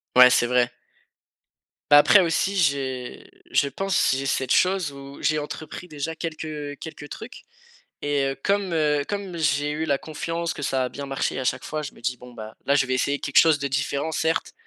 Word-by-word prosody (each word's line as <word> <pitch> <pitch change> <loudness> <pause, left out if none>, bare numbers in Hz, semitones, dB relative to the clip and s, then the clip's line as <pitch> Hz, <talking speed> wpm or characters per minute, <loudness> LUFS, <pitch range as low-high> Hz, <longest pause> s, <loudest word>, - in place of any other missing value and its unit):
Ouais, 125 0 +10
c'est 120 - +3
vrai. 125 0 +2 1.2
Bah, 145 - +10
après 190 +6 +7
aussi 180 +3 0
j'ai 135 -7 -1 0.2
je 140 - +3
pense, 195 +6 +1
j'ai 135 - -3
cette 130 -1 -1
chose 185 -4 +2
où 140 0 -11
j'ai 155 0 +2
entrepris 155 +4 -6
déjà 155 +1 -5
quelques, 160 -1 -5
heu, 150 -2 -5
quelques 150 -2 -8
trucs - - -9 0.6
et 145 -1 0
heu, - - -5
comme, 195 -3 +1
heu, 150 -2 +2
comme 200 -4 -4
j'ai 145 -2 +1
eu 155 +2 -2
la 140 -3 +1
confiance 165 +2 -3
que 145 - -6
ça 130 -1 0
a - - -4
bien 140 +2 -7
marché 135 0 -2
à 130 - -2
chaque 130 +1 -1
fois, 155 0 -4
je 140 - -7
me - - -17
dis: 125 0 -2
«Bon 125 0 -13
bah, 110 -1 -9
là 140 - +3
je 140 -3 +3
vais 130 - 0
essayer 140 +2 0
quelque 145 - -2
chose 160 -3 +6
de 140 - -1
différent 140 +3 -1
certes, 160 +1 -1
145 Hz, 210 wpm, -24 LUFS, 135-160 Hz, 1.2 s, Ouais